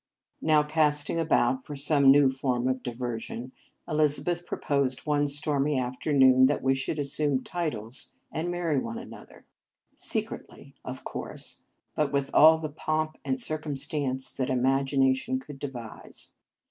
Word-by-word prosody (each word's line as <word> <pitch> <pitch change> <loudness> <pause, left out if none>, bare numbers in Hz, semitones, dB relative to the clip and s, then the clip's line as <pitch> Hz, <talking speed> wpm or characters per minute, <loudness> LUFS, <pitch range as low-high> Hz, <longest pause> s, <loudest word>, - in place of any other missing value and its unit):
Now, 155 -1 +4
casting 150 +1 +2
about 130 -5 +1
for 150 - -8
some 140 0 +4
new 140 -1 +5
form 130 -2 -1
of 130 0 -1
diversion, 120 0 -5 0.4
Elizabeth 155 +3 +1
proposed 140 -3 -1
one 145 -1 +1
stormy 145 0 0
afternoon 130 +1 +4
that 145 - -1
we 135 0 +3
should 135 +4 -2
assume 145 -1 +1
titles, 125 - -4 0.2
and 165 +2 -3
marry 170 -5 0
one 115 -2 -5
another; - - -12
Marriage - - -53
Vows - - -5
secretly, - - -3
of - - -7
course, - - -6 0.3
but 150 -2 0
with 140 -1 -1
all 160 +1 +7
the 155 -1 -5
pomp 155 +1 -2
and 260 -1 -1
circumstance 145 - -1
that 130 0 -3
imagina 135 +1 +2
tion 250 - -2
could 145 - -11
devise. 125 -6 -7
140 Hz, 145 wpm, -27 LUFS, 130-155 Hz, 0.4 s, all